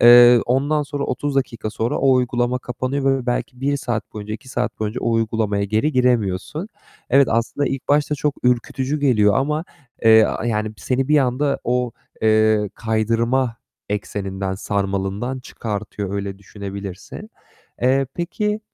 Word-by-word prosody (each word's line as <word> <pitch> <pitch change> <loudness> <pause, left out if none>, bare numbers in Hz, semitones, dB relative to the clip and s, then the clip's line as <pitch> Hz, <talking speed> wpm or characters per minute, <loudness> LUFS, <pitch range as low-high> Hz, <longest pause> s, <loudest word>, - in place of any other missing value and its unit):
Eee, 120 0 +9
ondan 140 +5 +1
sonra 145 -1 -3
30 145 +2 -2
dakika 120 -5 -1
sonra 115 +2 -1
o 135 0 +4
uygulama 125 0 +1
kapanıyor 135 +2 -1
ve 125 - -10
belki 125 +1 -2
1 140 +1 +1
saat 120 -5 -3
boyunca, 105 0 -5
2 115 +4 -11
saat 125 -1 -2
boyunca 110 +3 -2
o 115 - 0
uygulamaya 110 -3 0
geri 110 +9 +1
giremiyorsun. 125 - 0 0.4
Evet, 135 0 +5
aslında 115 +5 0
ilk 135 - -4
başta 150 +1 +2
çok 150 -1 -1
ürkütücü 130 +4 0
geliyor 105 -8 +4
ama, 150 +4 0 0.4
eee, 110 -1 +7
a 110 - -2
yani 110 -2 -1
seni 130 +4 -1
bir 150 0 +5
anda 140 +2 +1
o, 125 -1 0 0.3
eee, 110 -1 +3
kaydırma 115 +3 0 0.3
ekseninden, 100 -2 -3
sarmalından 100 +5 -2
çıkartıyor, 105 -4 -5
öyle 100 -1 -4
düşünebilirsin. 100 - -8 0.5
Eee, 135 +2 +3
peki, 210 +5 -2
120 Hz, 145 wpm, -21 LUFS, 105-135 Hz, 0.5 s, Eee